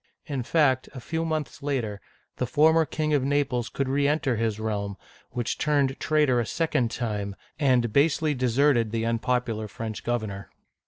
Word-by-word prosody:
In 140 -5 -3
fact, 130 -1 +2
a - - -5
few 160 +6 -3
months 155 -3 -3
later, 120 -8 -2 0.4
the 125 - -1
former 160 +5 +4
King 155 -1 -1
of 140 -3 +3
Naples 135 -4 0
could 140 - -2
reenter 140 0 +1
his 110 -1 -1
realm, 100 -2 -3 0.3
which 120 -2 -3
turned 140 -3 +1
traitor 150 -5 +2
a 120 - 0
second 140 -8 0
time, 105 -5 -3 0.2
and 125 -6 +2
basely 150 +2 +3
deserted 125 -1 +2
the 115 +1 -1
unpopular 115 -1 -1
French 110 0 -6
governor. 110 -5 -3
125 Hz, 155 wpm, -26 LUFS, 115-145 Hz, 0.4 s, former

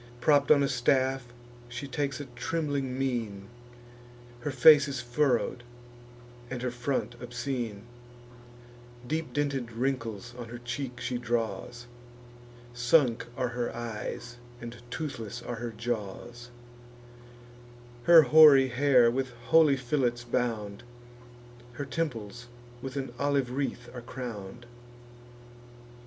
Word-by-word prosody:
Propp'd 145 +2 +3
on 145 -2 +6
a - - +2
staff, 130 0 +1 0.4
she 125 +4 -6
takes 140 0 -2
a 145 - -5
trembling 140 -1 -2
mien: 115 -7 -2 0.9
Her 135 - -3
face 140 +2 +7
is 135 -2 -3
furrow'd, 120 0 0 0.9
and 125 -1 -5
her 125 - -1
front 120 +1 -2
obscene; 120 -3 -4 1.2
Deep 155 +4 -2
dinted 140 -5 -1
wrinkles 120 -2 -3
on 120 -1 -7
her 120 - -7
cheek 125 +1 -5
she 125 0 -2
draws; 120 0 -3 0.9
Sunk 120 -1 +3
are 125 -2 0
her 120 0 -2
eyes, 120 +1 -6 0.2
and 120 -1 -7
toothless 120 -6 -5
are 120 - -5
her 120 +1 -4
jaws; 120 +1 -5 1.6
Her 170 -2 +9
hoary 140 -1 +8
hair 125 -2 +4
with 130 +1 -1 0.2
holy 155 -4 +6
fillets 120 -2 0
bound, 110 -4 -2 0.9
Her 145 +4 -5
temples 120 -6 -4 0.3
with 135 0 -6
an 135 -3 -4
olive 140 -3 +1
wreath 130 -2 -3
are 125 - -7
crown'd. 120 -3 -7
125 Hz, 115 wpm, -29 LUFS, 120-140 Hz, 1.6 s, Her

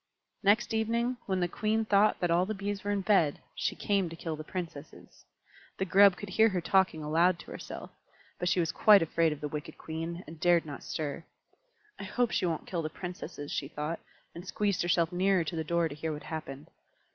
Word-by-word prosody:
Next 215 +4 +3
evening, 235 +3 0
when 190 -2 0
the 175 - +2
Queen 220 +4 0
thought 210 0 +4
that 175 -1 +1
all 175 +2 +3
the 215 - -2
Bees 200 0 -4
were 205 - -3
in 205 -1 +1
bed, 185 -7 +3
she - - -2
came 195 -4 0
to 165 - -8
kill 165 -1 -4
the 155 - -7
Princesses. 165 -4 -8 0.5
The 190 - -1
Grub 195 +1 +6
could 205 - -7
hear 220 +4 +4
her 190 -3 -1
talking 180 -3 +2
aloud 165 +4 +3
to - - -12
herself. - - -8 0.5
But 180 - 0
she 180 - +2
was 165 -2 +1
quite 205 +1 +6
afraid 165 0 +1
of 150 - -6
the 150 - -2
wicked 150 0 -6
Queen, 165 +2 -5
and 160 +1 -11
dared 175 0 +4
not 145 -3 -7
stir. 155 +1 -4 0.8
"I 200 - -5
hope 240 +4 0
she 180 - +1
won't 165 -2 -2
kill 175 -3 -2
the 155 - -3
Princesses," 175 -4 -7
she 140 - -2
thought, 150 +3 -4 0.3
and 170 - -8
squeezed 205 -1 0
herself 170 -1 +2
nearer 185 0 +2
to 165 +2 -4
the 160 - -1
door 170 +1 +1
to 150 - -7
hear 155 +2 -4
what 150 -1 -6
happened. 150 -3 -7
175 Hz, 215 wpm, -30 LUFS, 160-200 Hz, 0.8 s, Grub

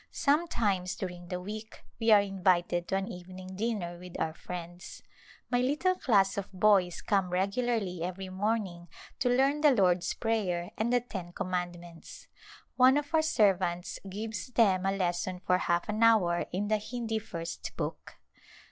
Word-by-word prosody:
Sometimes 225 - +1
during 175 -2 -6
the 180 0 -3
week 215 +4 -8 0.2
we 225 -1 +1
are 210 -1 +8
invited 180 -3 +1
to - - -1
an 195 0 -1
even 180 +1 -9
ing 185 0 -9
dinner 195 -5 -3
with 180 -1 -9
our 160 0 -1
friends. 175 +1 -8 0.5
My 245 0 +3
little 300 +8 +2
class 205 - +2
of 195 - -7
boys 190 -2 +3
come 195 -3 +1
regularly 195 0 -1
every 185 +2 -4
morning 190 -3 -2 0.3
to 250 - +2
learn 270 +4 +3
the 300 - +7
Lord's 185 -8 +2
Prayer 185 -6 -1
and 225 +3 -1
the 245 0 +3
Ten 190 -7 -7
Commandments. 175 -3 -5 0.5
One 260 +2 +6
of 295 +2 -3
our 320 - +5
servants 190 - +1
gives 215 +4 -5
them 195 -7 +3
a - - +2
lesson 180 0 -1
for 180 0 +3
half 170 -1 0
an 215 +1 -2
hour 205 -7 +4
in 200 +3 -1
the 215 +1 +2
Hindi 225 0 -3
First 170 -6 -6
Book. - - -5
195 Hz, 160 wpm, -30 LUFS, 180-225 Hz, 0.5 s, are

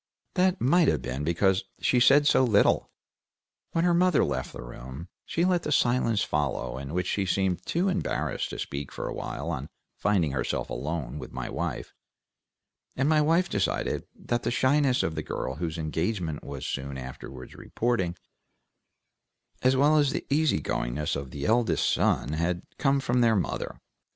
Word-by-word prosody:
That 185 0 +2
might 160 +6 +4
have - - +1
been 65 +2 -3
because 95 +4 +2 0.2
she 125 - +3
said 140 +4 +6
so 135 - +5
little. 105 -5 +3 0.8
When 165 - +2
her 175 - +4
mother 180 -3 +4
left 65 -1 -3
the - - -8
room 65 +7 -9 0.2
she 170 - +1
let 180 -3 +1
a - - -2
silence 120 -6 +2
follow 65 -4 -1
in 70 +1 -6
which 90 -1 0
she 95 +1 -1
seemed 90 -1 0
too 175 +4 +1
embarrassed 185 -1 -1
to - - -6
speak 70 0 -5
for - - -5
a - - -4
while 85 - -4
on 70 -2 -4 0.3
finding 95 -8 +1
herself 65 - -2
alone 75 -1 -3
with - - -8
my - - -5
wife, - - -4 1.0
and 135 - +1
my 155 0 +4
wife 165 +4 +3
decided 100 - -1
that 120 0 -2
the 120 - -1
shyness 130 +1 +3
of 80 - -1
the - - -3
girl 65 +2 -4
whose 85 0 -3
engagement 80 +1 -2
was 70 -2 -6
soon 70 0 -4
afterward 65 0 -9
reported, 95 -8 -1 1.4
as 130 +1 +4
well 145 +3 +4
as 145 -2 +4
the - - -3
easy 155 - +3
goingness 70 +3 -2
of 70 -1 -5
the 70 +1 -5
eldest 110 -8 +2
son, - - +2
had 85 +2 -1 0.2
come 140 -1 +3
from 125 -2 +1
their 115 -2 +4
mother. 95 - -2
95 Hz, 170 wpm, -27 LUFS, -, 1.4 s, said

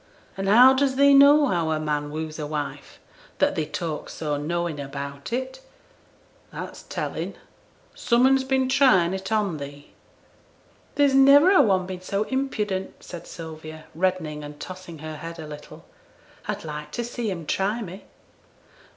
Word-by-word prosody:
'An' 195 0 -3
how 245 +6 +8
does 265 0 +1
thee 280 +1 +6
know 285 +2 +7
how 170 - 0
a 155 -1 0
man 150 -1 -2
woos 155 +1 -5
a 150 - -3
wife, 145 -2 -5 0.4
that - - +2
thee 155 -2 -2
talks 165 -4 -5
so 150 -2 -2
knowin' 165 +1 -2
about 140 +2 -6
it? 260 +2 -4 0.9
That's - - -7
tellin'. - - -4 0.6
Some 240 +1 +2
un's 270 0 +4
been 265 0 +1
tryin' 235 -10 +4
it 190 +2 -5
on 205 -7 0
thee.' 145 0 -10 1.0
'There's 285 -2 +3
niver 280 +6 +7
a 380 - +7
one 190 -7 +2
been 185 -1 -7
so 200 +2 -1
impudent,' 215 -7 -3
said 175 - -9
Sylvia, 155 -2 -9
reddening 165 -4 -1
and 145 0 -10
tossing 185 -2 -9
her 155 -1 -6
head 165 +2 -8
a 160 - -7
little; 150 -1 -11 0.6
'I'd - - -3
like 150 -1 -7
to 240 - -2
see 235 -1 -4
'em 170 -4 -5
try 205 +8 -1
me!' 190 +1 -10
185 Hz, 160 wpm, -24 LUFS, 155-245 Hz, 1.0 s, how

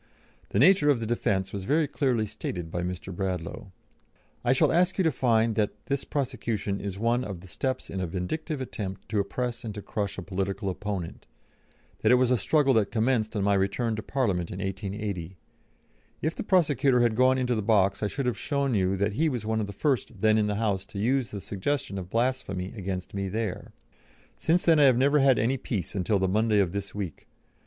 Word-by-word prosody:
The - - -2
nature 160 - +6
of 140 -5 +4
the 115 - -3
defence 105 -4 0
was 100 -2 -4
very 150 +4 +2
clearly 130 -6 0
stated 90 -5 -5
by 85 - -2
Mr. 90 +1 -5
Bradlaugh: 90 -1 -3 0.8
"I 120 - +3
shall 130 - +4
ask 180 +2 +2
you 190 - +3
to 160 - +3
find 115 -4 +2
that 105 -1 -2
this 140 0 -1
prosecution 120 -7 -2
is 100 -1 -5
one 120 +4 +1
of 95 -7 -6
the 95 - -12
steps 130 +7 -3
in 95 - -5
a 90 - -1
vindictive 135 - -3
attempt 100 -7 -5
to 105 - 0
oppress 120 +3 -2
and 110 -3 -5
to 105 - -5
crush 100 -2 -3
a 95 - -5
political 95 +1 -2
opponent 95 -2 -5 0.7
that 110 - +3
it - - +8
was 125 0 +3
a 125 - +4
struggle 140 +4 +3
that 110 -4 +2
commenced 115 -1 0
on 100 - 0
my 100 0 +3
return 100 +4 0
to 110 - -4
Parliament 100 -10 -1
in - - -6
1880. 95 -2 -4 0.9
If 155 +2 +1
the - - -4
prosecutor 145 - +3
had 120 -2 +2
gone 130 +2 +4
into 125 -1 +1
the 110 - 0
box 100 -2 +2
I 105 - +1
should 135 +5 -3
have 120 -5 -1
shown 140 -2 0
you 95 -2 +1
that 100 +2 0
he 160 +8 +2
was 120 -6 -3
one 110 0 0
of 105 - -2
the - - -6
first 125 -1 -1
then 110 0 +4
in 105 - +2
the 105 - -1
House 100 -3 0
to - - -9
use 125 +3 +1
the 100 - -6
suggestion 100 +1 -2
of 90 -1 -7
blasphemy 115 -5 -1
against 95 -3 -4
me 100 -1 -2
there. 110 -1 -3 0.6
Since 170 +3 +1
then 165 -2 +5
I 145 - +7
have 130 -3 +5
never 140 +3 +4
had 135 -2 +5
any 120 +5 +1
peace 100 -9 -4
until 100 +2 +1
the 95 0 +1
Monday 110 +3 +2
of 95 -4 +2
this 100 0 -5
week. 95 -6 -5
110 Hz, 215 wpm, -27 LUFS, 95-130 Hz, 0.9 s, it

